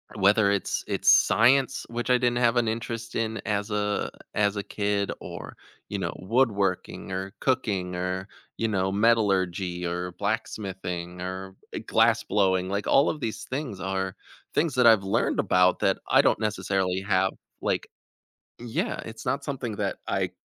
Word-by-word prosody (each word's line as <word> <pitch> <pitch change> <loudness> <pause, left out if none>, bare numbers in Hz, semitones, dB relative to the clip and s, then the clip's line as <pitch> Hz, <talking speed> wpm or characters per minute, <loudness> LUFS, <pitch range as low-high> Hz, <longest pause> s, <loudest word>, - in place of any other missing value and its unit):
whether 100 0 +4
it's 100 -3 -1
it's - - +1
science 130 +3 +4
which 120 +2 -3
I 125 - +6
didn't 120 -1 +1
have 120 0 +3
an 115 -2 +2
interest 115 +1 -4
in 110 -1 -1
as 105 0 -1
a 105 0 -1 0.2
as 105 0 +2
a 100 - -2
kid 100 -1 -1
or, - - -8 0.3
you 100 - -2
know, 90 -2 -2
woodworking, 100 -4 0
or 95 +1 -4
cooking 95 -8 0
or, 90 +1 -3 0.3
you 115 - 0
know, 95 -3 0
metallurgy 95 -5 +1
or 90 +1 -3
blacksmithing 95 -4 -3
or, 95 +1 -5 0.2
eh, - - -3
glassblowing, 95 -2 +2
like 100 +1 -2
all 140 +2 +5
of 155 - -3
these 110 - -3
things 130 -8 -4
are 95 0 -2 0.4
things 155 -4 +1
that 125 -2 +5
I've 110 -3 +6
learned 95 - 0
about 90 0 +3
that - - +2
I - - +6
don't - - +2
necessarily 95 -3 0
have, 95 -1 +2 0.3
like - - -1 0.7
yeah, 120 -1 -2
it's 110 0 -9
not 140 +1 0
something 130 -6 -4
that - - -1
I - - 0
100 Hz, 160 wpm, -26 LUFS, 95-115 Hz, 0.7 s, I